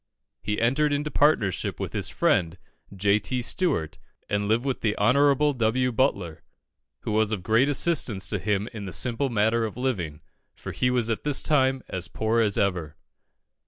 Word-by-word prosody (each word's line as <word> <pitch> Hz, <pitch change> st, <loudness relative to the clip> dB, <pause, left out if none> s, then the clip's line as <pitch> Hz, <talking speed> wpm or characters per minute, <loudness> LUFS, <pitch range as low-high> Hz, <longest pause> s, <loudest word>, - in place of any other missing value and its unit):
He 105 Hz, 0 st, -2 dB
entered 135 Hz, +6 st, +2 dB
into 145 Hz, +1 st, -1 dB
partnership 130 Hz, -, +1 dB
with -, -, -4 dB
his -, -, -2 dB
friend, 85 Hz, +1 st, +1 dB, 0.3 s
J. 100 Hz, +2 st, +2 dB
T. 125 Hz, +5 st, -2 dB
Stewart, 130 Hz, -, -1 dB, 0.3 s
and 105 Hz, 0 st, -1 dB
lived 115 Hz, +4 st, +1 dB
with 135 Hz, -2 st, -2 dB
the 105 Hz, -2 st, 0 dB
Hon. 110 Hz, +4 st, +3 dB, 0.4 s
W. 125 Hz, +1 st, +1 dB
Butler, 100 Hz, -, -1 dB, 0.6 s
who -, -, -4 dB
was 110 Hz, 0 st, +2 dB
of 100 Hz, -5 st, -3 dB
great 115 Hz, +7 st, +3 dB
assistance 135 Hz, -, 0 dB
to 105 Hz, -, -1 dB
him 105 Hz, +1 st, -1 dB
in 105 Hz, -3 st, -6 dB
the 90 Hz, -, -6 dB
simple 125 Hz, -, -1 dB
matter 115 Hz, 0 st, +1 dB
of 110 Hz, +1 st, -4 dB
living, 90 Hz, -, -3 dB, 0.3 s
for -, -, -7 dB
he 125 Hz, -, 0 dB
was 120 Hz, -2 st, +1 dB
at 110 Hz, -, -3 dB
this 145 Hz, -2 st, 0 dB
time 130 Hz, -3 st, +2 dB
as 95 Hz, -1 st, -5 dB
poor 110 Hz, +1 st, 0 dB
as 105 Hz, -3 st, +1 dB
ever. 85 Hz, -6 st, -1 dB
110 Hz, 175 wpm, -25 LUFS, 100-130 Hz, 0.6 s, Hon